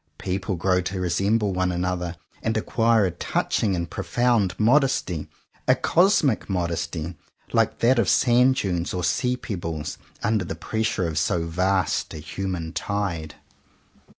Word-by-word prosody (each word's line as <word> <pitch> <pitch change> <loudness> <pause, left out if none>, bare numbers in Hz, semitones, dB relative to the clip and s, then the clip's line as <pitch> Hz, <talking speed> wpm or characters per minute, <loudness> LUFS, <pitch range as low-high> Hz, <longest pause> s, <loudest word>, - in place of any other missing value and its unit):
People 95 +1 -2
grow 90 +2 +2
to 95 +1 -4
resemble 100 +4 +1
one 90 0 +1
another 90 -1 -2 0.3
and 110 0 0
acquire 115 -1 +2
a 90 - 0
touching 95 +3 0
and 85 -1 -2
profound 115 +1 0
modesty, 115 - +2 0.4
a - - +6
cosmic 170 - +2
modesty, 85 -2 -2 0.4
like - - +2
that 120 +1 +4
of 100 - +2
sand 125 +1 +4
dunes 90 -8 -1
or 90 - -2
sea 125 +7 +1
pebbles, 85 -10 -5 0.2
under 110 -3 +1
the 85 - -5
pressure 110 -4 -1
of 80 -1 -1
so 85 0 +1
vast 95 +2 0
a - - -5
human 85 +1 -4
tide. 85 -4 -3
95 Hz, 140 wpm, -24 LUFS, 85-110 Hz, 0.4 s, a